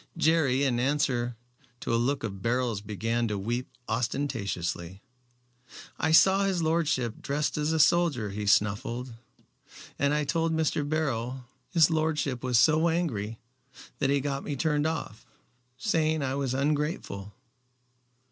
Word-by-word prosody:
Jerry 155 -5 +3
in 125 -4 +1
answer 125 -3 0 0.4
to - - -2
a - - +4
look 135 +2 0
of 100 -4 -5
Beryl's 120 -2 0
began 115 +3 -1
to 105 -1 -2
weep 120 +6 -3 0.2
ostentatiously. 100 -8 -2 1.0
"I 160 - +1
saw 190 +4 +6
his 190 -4 0
lordship 155 -8 0
dressed 145 +2 -1
as 150 +1 0
a 160 - +1
soldier," 150 - +3
he 105 +1 -4
snuffled, 105 +5 +1 0.9
"and 140 0 +2
I 150 - +1
told 165 +3 0
Mr. 150 -2 0
Beryl. 130 -5 -2 0.2
His 165 -1 +4
lordship 155 -5 0
was 125 -2 +2
so 155 +7 +4
angry 115 -11 -2 0.6
that 135 - +1
he 140 0 +2
got 140 0 -3
me 145 - -3
turned 150 +1 +1
off, 120 -8 -4 0.5
saying 155 +2 +1
I 130 -1 -1
was 135 -2 -1
ungrateful." 145 - -2
135 Hz, 140 wpm, -28 LUFS, 115-155 Hz, 1.0 s, saw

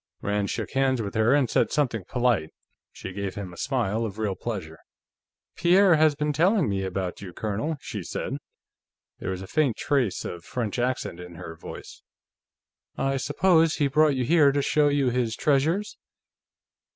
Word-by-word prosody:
Rand 100 0 0
shook - - -3
hands 135 -1 +2
with 100 -3 -3
her, 110 +5 +3
and 140 -3 +3
said - - +2
something 115 -10 0
polite. 120 -10 +1 0.4
She 95 - -8
gave 100 0 -4
him 95 -3 -6
a - - -11
smile 115 -1 -1
of 105 -3 -4
real 105 -3 -1
pleasure. 90 -6 -6 0.8
"Pierre 180 +1 +5
has 155 -1 +4
been 150 0 -1
telling 180 - +3
me 100 -1 -1
about 95 -1 -3
you, 95 -3 -7
Colonel," 110 - -2
she 105 - -5
said. 85 - -4 0.8
There - - -4
was 95 0 -4
a - - -9
faint 140 -5 +1
trace 135 -9 0
of 85 -1 -6
French 120 +1 -3
accent 125 -8 -2
in 90 -1 -10
her 80 0 -8
voice. - - -10 1.0
"I 135 0 0
suppose 165 +2 +3
he 145 - +1
brought 150 +1 +3
you 130 -1 0
here 150 -1 +5
to 140 0 0
show 150 +1 +3
you 140 -3 +2
his 120 -2 0
treasures?" 160 +9 +1
125 Hz, 175 wpm, -26 LUFS, 100-145 Hz, 1.0 s, Pierre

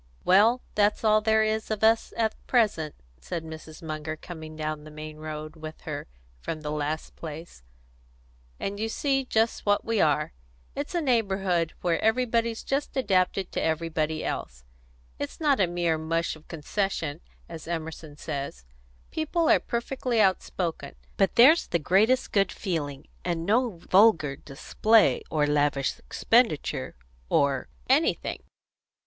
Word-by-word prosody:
"Well, 220 +7 +5
that's 210 +1 +2
all 215 -1 +4
there 220 0 +3
is 220 0 -1
of 215 -1 -2
us 225 +1 +4
at 220 -1 +1
present," 205 - +1 0.2
said 165 - -5
Mrs. 160 0 -10
Munger, 155 0 -4
coming 160 -1 -9
down 155 -1 -4
the 155 - -11
main 155 0 -8
road 155 0 -6
with 155 0 -9
her - - -5 0.3
from 155 - -5
the 150 -1 -4
last 150 +1 -3
place, 160 - -9 1.0
"and 200 +1 -3
you 220 +1 -1
see 270 +3 0
just 225 -2 0
what 205 0 +2
we 225 -2 +1
are. 150 - +2 0.4
It's 285 +5 -4
a 345 - +2
neighbourhood 195 - +1
where 170 -2 +1
everybody's 230 0 +1
just 275 0 -2
adapted 190 -5 +1
to - - -2
everybody 160 -1 -1
else. - - -4 0.6
It's 145 - -5
not 290 -5 +3
a 190 - +4
mere 170 -2 0
mush 165 +1 -1
of 155 - -18
concession, 165 -1 -2 0.3
as 165 -2 -9
Emerson 160 -2 -5
says; 140 - -5 0.5
people 320 +1 0
are - - +6
perfectly 240 0 -2
outspoken; 180 -6 0 0.2
but 195 -2 +2
there's 285 +8 +7
the 170 - +1
greatest 205 - +2
good 200 -1 +2
feeling, 150 -7 -4 0.2
and 170 -2 -2
no 225 -1 +1
vulgar 185 -8 +5
display, 215 +11 +2
or 150 -2 +2
lavish 145 -2 +1
expenditure, 230 - +1 0.3
or 140 - +2 0.2
anything." - - +1
175 Hz, 140 wpm, -27 LUFS, 155-220 Hz, 1.0 s, there's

